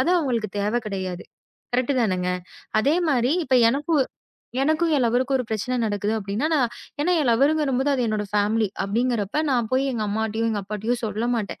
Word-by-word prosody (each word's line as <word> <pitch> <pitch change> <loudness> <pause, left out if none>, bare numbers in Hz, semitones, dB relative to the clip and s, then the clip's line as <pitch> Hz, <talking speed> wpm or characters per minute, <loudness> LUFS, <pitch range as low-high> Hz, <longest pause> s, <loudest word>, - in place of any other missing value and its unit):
அது 345 - +2
அவங்களுக்கு 240 -9 -1
தேவை 210 +4 +1
கிடையாது. 185 -3 -4 0.5
கரெக்ட் 255 +3 +1
தானுங்க. 185 -5 0 0.5
அதே 285 +8 +2
மாரி 250 -1 +2
இப்ப 260 - +1 0.2
எனக்கு 295 +6 -1 0.7
எனக்கும் 315 +3 +2
என் 270 - +2
லவ்வருக்கும் 255 +3 +2
ஒரு 250 - -2
பிரச்சனை 220 +3 -2
நடக்குது, 205 0 -1
அப்படின்னா 205 +7 -2
நான் 260 -7 +2 0.3
என்ன 320 +5 +1
என் 280 - +1
லவ்வர் 270 +6 +4
வரும்போது 270 -1 +1
அது 270 - 0
என்னோட 215 -1 -1
பேமலி. 210 +1 +2
அப்படிங்கறப்ப 230 +4 0
நான் 240 -4 +1
போய் 260 +1 +3
எங்க 230 -3 -2
அம்மாட்டியும், 220 +1 -1
அப்பாட்டியும் 215 +4 -3
சொல்லமாட்டேன். 220 0 -2
235 Hz, 165 wpm, -24 LUFS, 210-265 Hz, 0.7 s, லவ்வர்